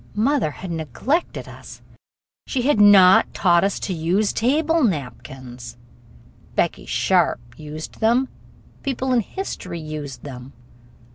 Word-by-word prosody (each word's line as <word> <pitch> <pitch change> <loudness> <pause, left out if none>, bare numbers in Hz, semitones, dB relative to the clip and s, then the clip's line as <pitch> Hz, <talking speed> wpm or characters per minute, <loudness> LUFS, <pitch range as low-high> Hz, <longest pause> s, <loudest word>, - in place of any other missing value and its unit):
Mother 235 - +1
had 180 +4 -8
neglected 165 - -2
us - - -12 0.7
she 255 -3 -1
had 260 -5 +3
not 195 -3 +7
taught 175 -2 +3
us 200 0 0
to 190 - -2
use 180 +6 0
table 305 +7 +2
napkins! 130 - -4 0.8
Becky - - -1
Sharp - - +2 0.2
used 155 +1 -9
them. 235 +4 +3 0.5
People 265 -1 -1
in 245 - +4
history 185 - -6
used 150 -4 -7
them. 130 -1 -9
185 Hz, 120 wpm, -22 LUFS, 150-250 Hz, 0.8 s, not